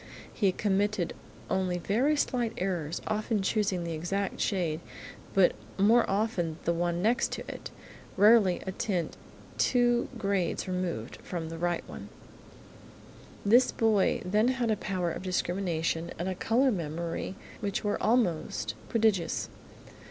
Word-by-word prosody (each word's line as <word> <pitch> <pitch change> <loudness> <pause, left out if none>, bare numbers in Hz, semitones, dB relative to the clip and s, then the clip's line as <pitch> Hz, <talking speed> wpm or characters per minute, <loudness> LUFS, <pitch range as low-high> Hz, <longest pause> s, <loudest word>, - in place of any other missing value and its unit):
He 200 -4 +2
committed 200 -1 0 0.3
only 185 -2 0
very 240 - +2
slight 245 -5 0
errors, 175 -4 -2
often 215 -1 0
choosing 195 -3 0
the 170 - -4
exact 190 +5 -2
shade 170 -6 0 0.6
but 190 -2 +6 0.3
more 220 +5 +4
often 195 -6 0
the 170 - +2
one 175 +1 -1
next 240 +4 +1
it, - - -7 0.5
rarely 205 -3 +5
a 190 - -2
tint 180 -4 -2 0.4
two 240 -1 +3
grades 195 -6 -1
removed 180 -11 -3
from 165 -2 -5
the 165 0 -7
right 175 0 -1
one. - - -9 1.4
This 240 +5 +5
boy 220 -4 +2
had 180 - -6
then 235 +2 +2
a - - +3
power 185 -4 -2
of - - -5
discrimination 175 -3 -1
and 175 - -3
a 190 - 0
colour 245 +8 +2
memory 170 0 -3 0.2
which 200 -2 -2
were 205 -1 -1
almost 215 -8 +1 0.2
prodigious. 215 -7 +1
190 Hz, 130 wpm, -29 LUFS, 175-220 Hz, 1.4 s, but